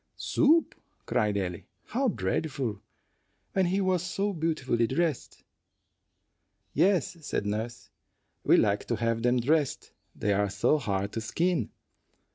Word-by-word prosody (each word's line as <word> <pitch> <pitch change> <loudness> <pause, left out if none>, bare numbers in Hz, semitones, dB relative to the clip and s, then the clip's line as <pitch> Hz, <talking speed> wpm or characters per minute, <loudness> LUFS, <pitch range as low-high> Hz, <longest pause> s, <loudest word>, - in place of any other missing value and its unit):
"Soup!" 320 +2 +3 0.3
cried 105 -4 +1
Ellie; 90 -3 -4 0.2
"how 265 +3 0
dreadful, 130 - -2 0.7
when 190 -2 +2
he 190 +3 +1
was 185 -3 +1
so 195 +3 -1
beautifully 155 -8 0
dressed!" 155 +2 -2 1.3
"Yes," 185 -3 +2
said 105 - -2
nurse, 110 +3 -4 0.5
"we - - +5
like 100 0 +2
to 120 - -1
have 115 0 0
them 125 +1 +3
dressed; 145 +3 0 0.2
they 105 - 0
are 100 +1 +1
so 105 +10 +2
hard 100 -5 -2
to 115 - -3
skin." 165 - 0
125 Hz, 125 wpm, -28 LUFS, 105-175 Hz, 1.3 s, we